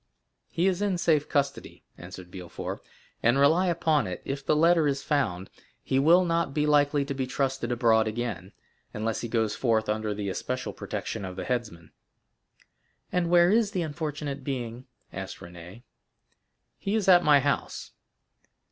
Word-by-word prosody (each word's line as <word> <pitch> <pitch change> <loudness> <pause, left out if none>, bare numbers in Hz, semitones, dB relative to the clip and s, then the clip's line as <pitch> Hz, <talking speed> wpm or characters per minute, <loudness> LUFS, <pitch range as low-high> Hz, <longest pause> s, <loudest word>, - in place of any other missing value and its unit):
"He 170 - 0
is 190 0 +1
in 200 -3 0
safe 155 -4 +1
custody," 140 -1 -2
answered 90 0 -11
Villefort; 90 -2 -7 0.4
"and 120 +3 +3
rely 160 +7 +4
upon 160 - +1
it, 90 -1 -6
if 135 0 -4
the 150 - +2
letter 165 0 +4
is 140 -1 -1
found, 95 - -1 0.3
he 135 - +1
will 170 +6 +5
not 165 -4 0
be 150 -1 +2
likely 145 -1 +3
to 140 - -3
be 130 -1 -3
trusted 135 -2 -2
abroad 115 -2 +3
again, 105 -5 -4 0.4
unless 110 +1 -2
he 120 - -4
goes 110 -2 0
forth 110 -3 +1
under 105 0 -1
the 100 -1 -4
especial 95 - -3
protection - - -5
of 95 -1 -6
the - - -5
headsman." 110 -10 -4 1.2
"And 180 -2 0
where 175 +1 +5
is 215 -2 +2
the 180 - 0
unfortunate 150 -2 -4
being?" 125 -2 -5 0.3
asked 95 -1 -6
Renée. 90 +6 -12 1.0
"He 200 +2 -2
is 215 -4 0
at 180 -2 +7
my 145 -2 +6
house." - - -2
135 Hz, 160 wpm, -27 LUFS, 110-160 Hz, 1.2 s, at